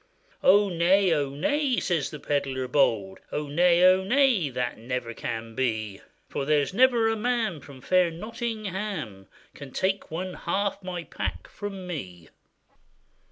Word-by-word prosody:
Oh! 205 +2 +6
nay, 180 +2 +3
oh! 145 -3 0
nay,' 265 - 0
says 165 -6 0
the 150 - -8
pedlar 135 -3 -1
bold, 110 -9 +1
'Oh! 150 - -2
nay, 175 +4 +4
oh! 185 +1 +6
nay, 240 - +3
that 125 -3 -3
never 120 0 -4
can 115 0 -5
be, 110 -5 -2 0.3
For - - -3
there's 145 +2 +1
never 240 0 +4
a 225 - +1
man 225 -6 -1
from 135 -1 -13
fair 180 +2 +3
Nottingham 200 - -5 0.3
Can 140 -2 -10
take 190 +6 -1
one 180 +3 -4
half 200 +3 -2
my 180 -2 -5
pack - - -5
from 195 -3 -7
me. 90 - -7
170 Hz, 145 wpm, -26 LUFS, 135-200 Hz, 0.3 s, Oh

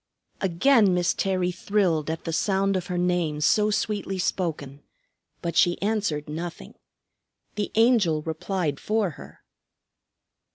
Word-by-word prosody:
Again 195 +2 +3
Miss 175 -1 +1
Terry 185 -2 0
thrilled 180 -5 0
at 160 0 -4
the 165 - -4
sound 195 +2 +1
of 180 -1 -2
her 180 -2 -3
name 175 -4 0
so 210 +7 +3
sweetly 205 -2 -2
spoken; 155 -7 -3 0.6
but 170 -1 -3
she 175 -2 +3
answered 200 -8 -1
nothing. 165 +3 -6 0.8
The 210 -1 -3
Angel 215 -10 +3
replied 160 -2 -2
for 215 -4 0
her. - - -14
180 Hz, 125 wpm, -25 LUFS, 165-200 Hz, 0.8 s, Again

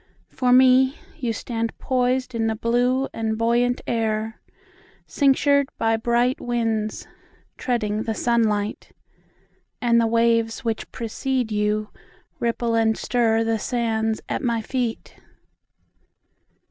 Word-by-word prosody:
For 250 -1 0
me, 260 +1 +5 0.2
You 240 -3 -1
stand 230 +1 -4
poisedIn 250 -2 0
the 220 - 0
blue 245 +4 +1
and 220 -1 -2
buoyant 240 +2 +1
air, 220 -1 -2 0.7
Cinctured 280 0 +3
by 225 0 +2
bright 240 +3 +1
winds, 225 -3 -2 0.5
Treading 215 -4 -1
the 220 0 -3
sunlight. 220 -3 0 0.9
And 235 -1 +3
the 230 - +2
waves 230 0 +1
which 225 -1 -3
precede 250 +1 -2
youRipple 215 +2 -3
and 220 0 +2
stirThe 225 -2 +1
sands 225 -3 -1
at - - -2
my 235 -3 -1
feet. 245 -2 -3
230 Hz, 105 wpm, -23 LUFS, 225-245 Hz, 0.9 s, me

